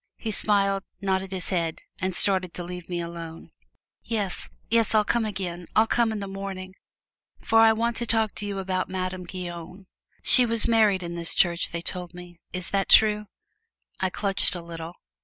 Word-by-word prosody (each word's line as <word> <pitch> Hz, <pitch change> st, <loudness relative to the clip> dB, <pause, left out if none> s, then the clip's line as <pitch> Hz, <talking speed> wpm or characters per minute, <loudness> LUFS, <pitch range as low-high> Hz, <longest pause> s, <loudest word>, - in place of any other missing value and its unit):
He 220 Hz, -, -4 dB
smiled, 195 Hz, -2 st, +2 dB, 0.2 s
nodded 190 Hz, -1 st, -1 dB
his 185 Hz, -1 st, -3 dB
head 165 Hz, -4 st, -2 dB, 0.2 s
and 185 Hz, -2 st, -2 dB
started 185 Hz, -3 st, +2 dB
to 175 Hz, -, -5 dB
leave 180 Hz, 0 st, -8 dB
me 175 Hz, -1 st, -2 dB
alone. 170 Hz, -1 st, -7 dB, 0.5 s
"Yes, 205 Hz, -5 st, -2 dB, 0.2 s
yes, 230 Hz, -1 st, +2 dB
I'll 215 Hz, -, +5 dB
come 235 Hz, 0 st, +1 dB
again 180 Hz, -4 st, -5 dB
I'll 220 Hz, -, +6 dB
come 230 Hz, 0 st, +1 dB
in 220 Hz, -, -3 dB
the 200 Hz, -, -5 dB
morning, 195 Hz, -1 st, -6 dB, 0.6 s
for 225 Hz, 0 st, +2 dB
I 225 Hz, 0 st, +7 dB
want 230 Hz, +1 st, -1 dB
to 235 Hz, -, -2 dB
talk 220 Hz, -1 st, +2 dB
with -, -, -6 dB
you 205 Hz, -1 st, -4 dB
about 190 Hz, -1 st, -2 dB
Madame 185 Hz, -1 st, -4 dB
Guyon 180 Hz, +1 st, -8 dB, 0.4 s
she 255 Hz, -, +7 dB
was 230 Hz, -2 st, +3 dB
married 215 Hz, -5 st, +3 dB
in 170 Hz, 0 st, -5 dB
this 170 Hz, -1 st, -2 dB
church 175 Hz, -1 st, +2 dB
they 170 Hz, 0 st, -4 dB
told 180 Hz, -1 st, -4 dB
me 175 Hz, -1 st, -12 dB
is 185 Hz, -1 st, -3 dB
that 195 Hz, -1 st, 0 dB
true?" 210 Hz, -1 st, +5 dB, 0.7 s
I 190 Hz, -, +1 dB
clutched 195 Hz, 0 st, +2 dB
a 175 Hz, -, -5 dB
little. 165 Hz, 0 st, -8 dB
190 Hz, 185 wpm, -25 LUFS, 175-210 Hz, 0.7 s, I